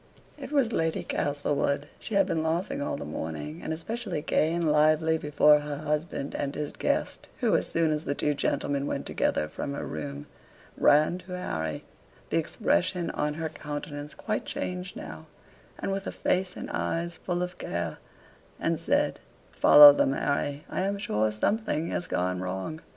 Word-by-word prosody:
It 275 -2 -9
was 270 -6 +2
Lady 165 -3 0
Castlewood 145 0 -1
she 220 - -5
had 195 -1 +5
been 165 -4 -1
laughing 160 0 -1
all - - -2
the - - -6
morning, 75 0 -5
and - - -4
especially 175 0 -4
gay 160 0 +2
and 170 -2 +1
lively 155 +1 +3
before 150 0 +5
her 145 -1 -4
husband 150 -1 -2
and 140 0 -3
his 150 -1 -3
guest - - -1
who - - +3
as - - +2
soon 165 -1 +2
as 150 0 -1
the 140 - -2
two 150 - +1
gentlemen 140 0 -1
went - - -3
together 75 - 0
from 140 - -5
her - - -4
room, 75 -2 -5 0.5
ran 155 +5 +4
to 180 0 -7
Harry, 80 - -3 0.5
the - - +3
expression 170 - 0
of 150 0 -1
her 160 0 -3
countenance 145 -1 -6
quite 215 -1 -2
changed 180 0 -4
now, 80 0 -8 0.5
and - - -3
with 195 0 -3
a - - -2
face 185 0 0
and - - -6
eyes 170 +1 -2
full 175 -1 -2
of 180 0 -6
care, - - -3 0.6
and - - 0
said, - - +1 0.3
"Follow 145 -1 +10
them, 135 - +2
Harry, 140 +1 -1
I - - -2
am 200 +1 0
sure 110 - 0
something 165 - 0
has 175 - -2
gone 90 0 -1
wrong." 95 - -4
150 Hz, 170 wpm, -28 LUFS, 140-175 Hz, 0.6 s, Follow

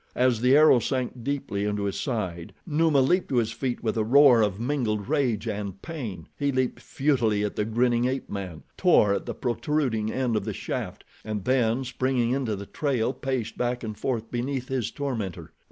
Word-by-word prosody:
As 125 -3 +2
the 130 +3 +5
arrow 155 -5 +7
sank 125 0 -3
deeply 135 -7 -2
into 105 0 -1
his 100 -1 -2
side, 95 - -3
Numa 155 -3 +3
leaped 175 +8 +2
to 135 - -1
his 115 -2 +2
feet 125 0 -3
with 110 - 0
a 110 - +2
roar 130 0 +6
of 105 -2 0
mingled 115 -5 -1
rage 125 -7 0
and 100 -3 -4
pain. 115 - -6
He 140 0 +1
leaped 130 -1 -1
futilely 120 -8 +1
at 105 - -2
the 105 - 0
grinning 120 +2 +2
ape 130 +1 -2
man, 95 -5 -6
tore 110 - +4
at - - -3
the - - -4
protruding 120 -4 -1
end 125 -3 0
of 105 - 0
the 105 -1 -4
shaft, - - -5 0.2
and 105 -3 -4
then, 125 -1 +2
springing 125 -1 0
into 130 -5 0
the 100 +1 -7
trail, 130 -1 -1
paced 130 -6 -3
back 125 0 -1
and 110 -2 -4
forth 115 -2 -3
beneath 125 +1 -3
his 125 -4 -1
tormentor. 115 -11 -4
120 Hz, 190 wpm, -26 LUFS, 105-135 Hz, 0.2 s, arrow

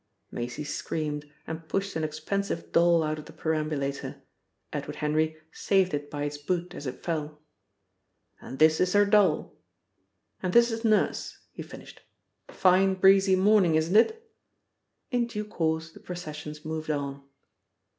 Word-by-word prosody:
Maisie 120 +4 -4
screamed, 150 0 -4 0.2
and 160 0 -7
pushed 195 0 -2
an 160 - -1
expensive 165 +4 -3
doll 170 -1 +4
out 155 0 -2
of 150 - -10
the - - -12
perambulator. 155 -3 -3 0.5
Edward - - -4
Henry 155 +1 0
saved 190 -2 +1
it 145 0 -3
by 145 0 -4
its 145 0 -4
boot 175 +4 -2
as 145 - -7
it 130 - -7
fell. 150 -3 -3 1.0
"And 130 - -8
this 155 +2 +5
is 180 0 +2
her 205 0 +5
doll. 200 -6 +3 0.9
And 185 -1 -2
this 235 0 +6
is 225 +1 -4
Nurse," 215 -2 +1
he - - -8
finished. - - -11 0.5
"Fine 190 +1 +3
breezy 190 0 +5
morning, 190 -3 +4
isn't 160 +4 +1
it?" 445 - +3 0.8
In 245 -2 +1
due 210 -2 -4
course 160 -4 -2
the - - -14
processions 150 -4 -7
moved 155 0 -4
on. 140 -2 -2
160 Hz, 145 wpm, -27 LUFS, 150-195 Hz, 1.0 s, this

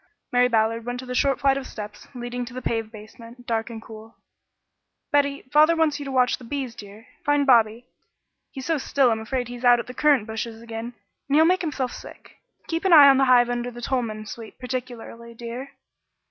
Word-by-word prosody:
Mary 250 -1 +4
Ballard 225 -1 +1
went 245 +1 -4
to 255 - -7
the 250 - -5
short 270 +1 +1
flight 275 -1 +3
of 270 - -5
steps 210 -1 -9
leading 245 0 -4
to 245 +1 -9
the 255 - -5
paved 225 -1 -2
basement, 230 +3 -13
dark 225 -1 -2
and 225 -1 -8
cool: 220 0 -13 0.9
"Betty, 285 -1 +1
father 310 +3 +6
wants 315 -2 +1
you 285 - -6
to 275 - -5
watch 250 -2 +2
the - - -13
bees, 260 0 -4
dear. 210 +1 -12 0.2
Find 290 -1 +2
Bobby. 235 -2 +3 0.6
He's 265 -2 -8
so 325 -3 0
still 265 -1 +2
I'm 220 - -1
afraid 245 +2 -3
he's 245 0 -9
out 245 -1 +6
at - - -4
the 250 - -9
currant 280 -4 +3
bushes 225 0 -5
again, 230 +1 -7 0.3
and 280 - +2
he'll 315 +1 +6
make 365 +2 +3
himself 280 -7 -2
sick. - - -13 0.3
Keep 330 +2 -3
an 375 - +4
eye 290 -3 +10
on 270 - +5
the 270 - +4
hive 245 -1 +5
under 245 0 -2
the 240 0 -10
Tolman 230 -4 -3
Sweet 220 +1 -10
particularly, 245 -2 -7
dear." 240 +4 -7
245 Hz, 210 wpm, -24 LUFS, 230-270 Hz, 0.9 s, eye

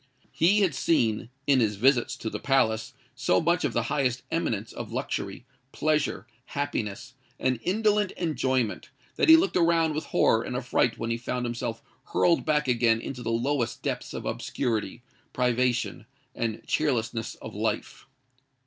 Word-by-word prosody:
He 195 +6 +3
had 185 -6 +2
seen, 120 -7 +1 0.2
in 140 -2 +4
his 105 -3 +1
visits 125 +3 +3
to 110 -4 -5
the - - -4
palace, 110 -5 +1 0.2
so 130 +1 +2
much 170 +1 +1
of 140 -5 0
the 120 - +1
highest 130 -1 0
eminence 115 -10 -2
of - - -7
luxury, - - -4 0.3
pleasure, 150 -10 0 0.2
happiness, 130 -4 -4 0.3
and 130 -2 0
indolent 210 - +2
enjoyment, 130 - -1 0.3
that - - +2
he 320 - +11
looked 365 +4 +1
around 165 -2 +3
with 155 - -3
horror 110 - +3
and 125 - -5
affright 125 -2 +1
when 115 0 -3
he 115 - 0
found 125 +1 -3
himself 115 -1 -4 0.3
hurled 170 -2 +3
back 150 -2 +1
again 115 -2 +3
into 125 +1 -6
the 115 - -3
lowest 120 +1 -1
depths - - -3
of - - -5
obscurity, 115 -3 -2 0.3
privation, 120 -5 0 0.3
and 115 -2 -3
cheerlessness 120 -6 -1
of - - -9
life. - - -3
125 Hz, 155 wpm, -27 LUFS, 115-150 Hz, 0.3 s, he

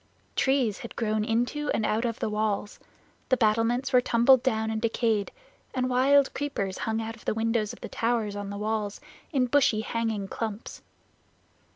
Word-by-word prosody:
Trees 265 -6 +1
had 235 - -9
grown 215 -2 0
into 245 +7 -1
and 220 - 0
out 220 +3 0
of 230 -1 -2
the - - -2
walls; 210 -1 -1 0.5
the 260 - +4
battlements 235 +4 +1
were 250 - +6
tumbled 245 +2 +5
down 220 -4 0
and 220 0 -2
decayed, 225 -2 0 0.4
and 255 0 0
wild 270 +2 +4
creepers 235 -10 -3
hung 220 0 -1
out 225 0 -4
of 230 - -18
the - - 0
windows 225 -1 0
of - - -12
the - - -5
towers 225 -3 -1
on 205 -1 -5
the 200 - -5
walls 210 -1 -2 0.3
in 265 -4 +2
bushy 245 -4 +3
hanging 220 -3 -2
clumps. 220 +1 -5
225 Hz, 175 wpm, -27 LUFS, 215-250 Hz, 0.5 s, were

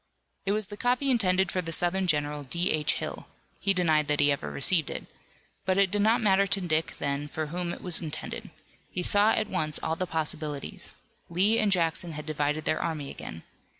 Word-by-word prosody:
It - - +3
was 215 0 +2
the 205 +2 -9
copy 250 +4 +2
intended 190 -5 +3
for 185 - 0
the 165 -2 -5
Southern 180 +3 +1
general, 150 -2 0
D. 170 +7 0
H. 150 -1 +1
Hill - - -5 0.3
he 195 - +2
denied 160 -5 +2
that 150 0 +2
he 145 0 +5
ever 140 - -2
received 160 +2 +2
it - - -5 0.6
but 185 0 +1
it 195 -2 +4
did 205 0 +1
not 225 +3 +4
matter 200 -1 +4
to 195 - +1
Dick 160 -3 0
then 140 +1 -2
for 155 +1 -3
whom 175 -1 -2
it - - -8
was 180 -3 +2
intended. 155 -3 -6 0.4
He 180 - -3
saw 205 +4 +4
at 215 - 0
once 155 -5 0
all 160 - 0
the 185 +2 -2
possibilities. 155 -3 -4 0.3
Lee 195 +6 +3
and 210 -2 +2
Jackson 170 -2 +1
had 150 0 -6
divided 150 0 -1
their - - +1
army 155 -4 -3
again. 80 - -8
170 Hz, 205 wpm, -28 LUFS, 150-195 Hz, 0.6 s, he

